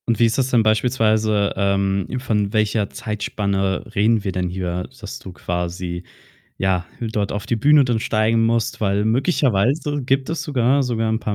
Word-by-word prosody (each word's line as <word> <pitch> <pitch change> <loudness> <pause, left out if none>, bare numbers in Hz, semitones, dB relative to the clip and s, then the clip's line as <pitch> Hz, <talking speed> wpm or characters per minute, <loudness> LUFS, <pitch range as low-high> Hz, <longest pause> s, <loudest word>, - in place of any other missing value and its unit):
Und 115 -2 +1
wie 115 - +6
ist 115 - +1
das 130 -1 +1
denn 120 -3 +3
beispielsweise, 110 -2 +2
ähm 100 -1 0
von 105 -5 -1
welcher 105 -1 +1
Zeitspanne 100 -3 -2
reden 110 +1 +3
wir 100 - -2
denn 90 -1 -2
hier, 90 0 -3 0.2
dass 105 -3 -7
du 95 - -10
quasi, 90 0 -4 0.5
ja, 95 -2 0
dort 110 -3 -2
auf 105 0 -4
die 120 - 0
Bühne 145 +5 +5
dann 120 -3 0
steigen 115 +1 +1
musst? 115 -1 0
Weil, 100 0 +1
möglicherweise 135 - +1
gibt 135 +3 0
es 165 -3 -2
sogar 135 -1 +2
sogar 115 -3 -1
'n 110 - 0
paar 105 -2 -3
110 Hz, 175 wpm, -21 LUFS, 100-120 Hz, 0.5 s, wie